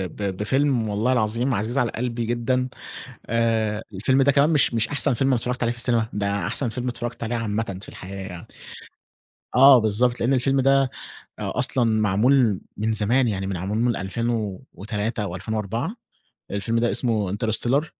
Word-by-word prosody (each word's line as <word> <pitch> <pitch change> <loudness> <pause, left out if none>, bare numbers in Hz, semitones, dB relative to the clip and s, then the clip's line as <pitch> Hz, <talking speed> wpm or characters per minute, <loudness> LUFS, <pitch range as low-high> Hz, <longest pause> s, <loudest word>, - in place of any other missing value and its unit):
ب 100 -3 -3
بفيلم 125 0 +1
والله 110 +5 +1
العظيم 120 +3 0
عزيز 110 +5 -2
على 120 -4 +1
قلبي 120 -1 -3
جدًا، 125 +2 0 0.6
آآ 110 -2 0
الفيلم 130 +8 +2
ده 140 +1 +4
كمان 145 +3 +3
مش 145 -6 +3
مش 115 -1 +1
أحسن 140 -2 +2
فيلم 135 +3 +1
أنا 130 - +3
اتفرّجت 125 +1 -2
عليه 115 - +1
في 120 - -8
السينما، 120 -2 +2
ده 100 -3 -1
أحسن 125 +2 -1
فيلم 125 +3 -4
اتفرّجت 120 -1 -4
عليه 120 +1 -2
عامةً 110 -3 -2
في - - -11
الحياة 95 +1 -9
يعني. 90 -2 -9 1.1
آه 135 0 +8
بالضبط، 115 +3 +1
لإن 125 +4 +2
الفيلم 135 +1 +2
ده 135 +1 +4 0.6
أ - - -3
أصلًا 125 -1 +2 0.2
معمول 110 +1 +3 0.2
من 110 +1 0
زمان، 120 +5 +2
يعني 95 -2 -2
معمول 95 +3 -3
من 120 0 +1
2003 105 +1 -3
أو 90 -3 -4
2004، 110 - -3 0.6
الفيلم 105 +3 -1
ده 120 0 +1
اسمه 110 -6 +1
interstellar، 120 +7 0
115 Hz, 165 wpm, -23 LUFS, 105-125 Hz, 1.1 s, آه